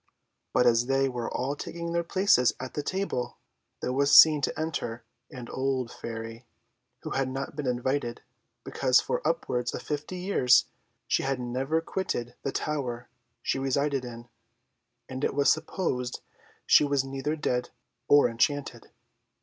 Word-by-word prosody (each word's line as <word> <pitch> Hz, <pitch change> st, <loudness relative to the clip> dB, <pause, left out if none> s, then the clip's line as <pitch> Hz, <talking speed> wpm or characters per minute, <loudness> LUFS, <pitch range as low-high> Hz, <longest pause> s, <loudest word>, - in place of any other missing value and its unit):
But 125 Hz, -, +3 dB
as 120 Hz, 0 st, +4 dB
they 135 Hz, 0 st, +2 dB
were 125 Hz, -3 st, -4 dB
all 135 Hz, +3 st, -2 dB
taking 170 Hz, +3 st, -5 dB
their 170 Hz, 0 st, +1 dB
places 170 Hz, -8 st, +3 dB
at 130 Hz, 0 st, -6 dB
the 150 Hz, -, -2 dB
table, 185 Hz, -6 st, -3 dB, 0.5 s
there 125 Hz, -, -1 dB
was 140 Hz, +1 st, +7 dB
seen 155 Hz, -2 st, +7 dB
to 140 Hz, -, -2 dB
enter 130 Hz, -7 st, -3 dB, 0.3 s
an 125 Hz, -2 st, -9 dB
old 130 Hz, -2 st, -2 dB
Fairy, 115 Hz, 0 st, -7 dB, 0.6 s
who -, -, -5 dB
had 135 Hz, -1 st, 0 dB
not 135 Hz, +2 st, -5 dB
been 145 Hz, -3 st, -3 dB
invited, 125 Hz, 0 st, -1 dB, 0.4 s
because -, -, +3 dB
for -, -, -2 dB
upwards 125 Hz, -1 st, -1 dB
of -, -, -6 dB
fifty 150 Hz, +5 st, -4 dB
years 180 Hz, -10 st, +4 dB, 0.4 s
she -, -, +2 dB
had 135 Hz, -1 st, -1 dB
never 130 Hz, +6 st, -1 dB
quitted 145 Hz, -10 st, -3 dB
the 135 Hz, -, -2 dB
tower 125 Hz, -6 st, -3 dB, 0.3 s
she -, -, 0 dB
resided 135 Hz, 0 st, 0 dB
in, 120 Hz, -1 st, -9 dB, 0.8 s
and 130 Hz, +1 st, -6 dB
it -, -, 0 dB
was 140 Hz, -1 st, +5 dB
supposed 125 Hz, -9 st, -3 dB, 0.4 s
she -, -, +6 dB
was 140 Hz, -2 st, +1 dB
either 135 Hz, +3 st, -3 dB
dead 125 Hz, -5 st, -1 dB, 0.4 s
or 145 Hz, -3 st, +6 dB
enchanted. 140 Hz, +5 st, -1 dB
135 Hz, 150 wpm, -28 LUFS, 125-145 Hz, 0.8 s, was